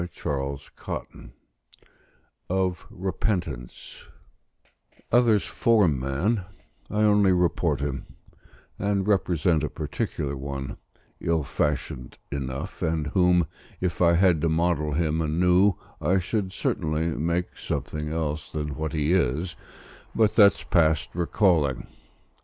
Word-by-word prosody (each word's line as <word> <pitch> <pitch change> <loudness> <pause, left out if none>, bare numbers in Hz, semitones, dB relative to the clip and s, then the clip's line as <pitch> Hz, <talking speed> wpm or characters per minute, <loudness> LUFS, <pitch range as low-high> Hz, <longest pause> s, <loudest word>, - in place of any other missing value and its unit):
CHAPTER 70 -1 -3 0.6
II - - -13 1.2
OF 90 -2 -1
REPENTANCE 85 - -4 1.0
Others 115 -4 +4
form 105 - +3
man; 85 - 0 0.5
I 105 +1 +1
only 105 -2 +5
report 90 -5 +1
him: 70 -2 -3 0.7
and 100 -1 0
represent 90 -5 +2
a - - -1
particular 70 -1 -3
one, 70 0 -5 0.4
ill 80 -2 0
fashioned 70 -3 -2
enough, 70 -1 -5
and 80 -1 0
whom, 90 0 +3 0.3
if 90 -1 -2
I 85 -1 +5
had 85 -2 +4
to 85 - +2
model 80 -2 +1
him 80 0 0
anew, 90 +5 +3 0.3
I 95 - +2
should 95 +1 -1
certainly 80 -2 -1
make 85 +3 -1
something 75 +2 -4
else 80 -2 -3
than 75 -1 -3
what 80 +2 -4
he 75 +1 +1
is 85 0 0 0.6
but 110 -2 +3
that's 100 -5 +6
past 80 -3 +2
recalling. 85 - +2
85 Hz, 110 wpm, -26 LUFS, 75-95 Hz, 1.2 s, that's